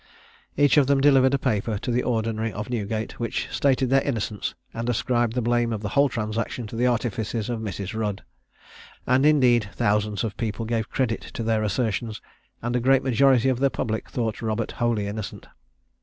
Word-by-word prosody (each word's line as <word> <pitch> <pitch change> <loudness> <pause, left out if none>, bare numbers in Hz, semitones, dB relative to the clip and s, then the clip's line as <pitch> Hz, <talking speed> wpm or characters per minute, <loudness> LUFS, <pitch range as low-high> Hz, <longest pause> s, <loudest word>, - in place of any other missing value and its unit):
Each 145 +1 +4
of 140 -3 +5
them 140 -1 +3
delivered 135 -1 +5
a - - +2
paper 110 -4 -1
to 120 - -3
the 120 +1 +2
Ordinary 115 -2 -1
of 105 +4 -6
Newgate, 110 -1 -3
which 115 -2 -2
stated 130 -2 +1
their 135 0 +5
innocence, 110 -7 -3 0.2
and 115 +1 -3
ascribed 120 0 +1
the 125 -1 -1
blame 120 0 +1
of 110 -1 -3
the 105 - -2
whole 140 +6 +3
transaction 110 +1 -3
to 105 - -8
the 120 +2 +2
artifices 115 -1 -1
of 115 - -2
Mrs. 100 -2 -5
Rudd; 105 -3 -3 0.8
and, 130 +3 +4
indeed, 125 -8 +4
thousands 105 0 +1
of 110 -3 -3
people 115 0 -3
gave 115 0 -2
credit 120 -4 -1
to 115 - -3
their 110 -1 +1
assertions, 110 +1 -1 0.4
and 120 +1 -1
a - - +3
great 135 +2 +3
majority 130 0 +4
of 130 -2 +1
the 140 0 +3
public 110 -4 -3
thought 115 -3 -2
Robert 110 0 -2
wholly 115 -3 0
innocent. 105 +1 -6
115 Hz, 185 wpm, -24 LUFS, 110-125 Hz, 0.8 s, of